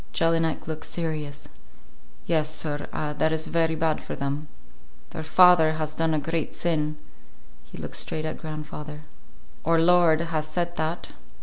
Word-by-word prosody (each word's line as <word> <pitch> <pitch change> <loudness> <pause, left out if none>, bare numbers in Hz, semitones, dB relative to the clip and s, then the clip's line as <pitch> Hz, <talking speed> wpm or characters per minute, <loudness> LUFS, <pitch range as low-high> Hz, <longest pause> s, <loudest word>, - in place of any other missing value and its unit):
Jelinek 165 -1 +1
looked 160 -1 -4
serious. 155 -4 -3 0.8
"Yes, 155 -2 +2
sir, 150 -2 0
that 150 +1 -1
is 160 0 0
very 165 -1 +1
bad 160 -1 0
for - - -6
them. 140 +2 -3 0.6
Their - - -5
father 160 0 +6
has 155 -1 -3
done 160 0 +1
a - - +1
great 160 +1 -2
sin," 155 -3 0 0.7
he - - -12
looked - - -4
straight 155 0 0
at 155 - -4
grandfather. 150 -1 -7 0.6
"Our 165 +1 +3
Lord 170 -1 +5
has 160 -2 -2
said 175 +2 -2
that." 160 +2 -2
160 Hz, 145 wpm, -26 LUFS, 155-165 Hz, 0.8 s, father